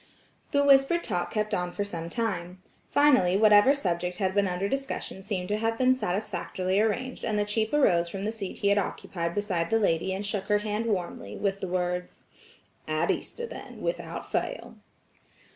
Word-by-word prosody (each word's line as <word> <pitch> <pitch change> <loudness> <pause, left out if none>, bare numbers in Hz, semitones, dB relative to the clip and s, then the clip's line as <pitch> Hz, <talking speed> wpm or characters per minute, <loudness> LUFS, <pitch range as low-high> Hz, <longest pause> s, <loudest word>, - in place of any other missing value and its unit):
The 285 0 +2
whispered 280 +5 +5
talk 180 -5 -2
kept 215 -1 -2
on 180 0 -1
for 205 - -2
some 170 -4 -5
time. 185 -5 -3 0.3
Finally, 255 -11 +4
whatever 210 +5 +6
subject 180 -7 -2
had 190 -1 0
been 200 0 +2
under 180 +2 -1
discussion 270 -5 -3
seemed 190 -2 -3
to 210 - +1
have 225 +1 0
been 255 +1 +4
satisfactorially 190 -2 -1
arranged, 250 +4 -2
and 215 - 0
the 205 - +1
chief 220 +1 -1
arose 175 -13 +3
from 195 +2 -5
the 215 - 0
seat 210 -4 -6
he 200 - +1
had 200 0 +4
occupied 170 -3 -3
beside 185 -5 -1
the 225 - +3
lady 190 -4 +1
and 195 +2 -3
shook 205 -1 -2
her 210 0 +3
hand 210 +2 -2
warmly, 175 - -3
with 195 -1 -1
the 190 - -2
words: 180 0 -2 0.6
"At - - +1
Easter 475 - -4
then 470 - -9
without - - -4
fail." - - -3
205 Hz, 180 wpm, -27 LUFS, 180-225 Hz, 0.6 s, whatever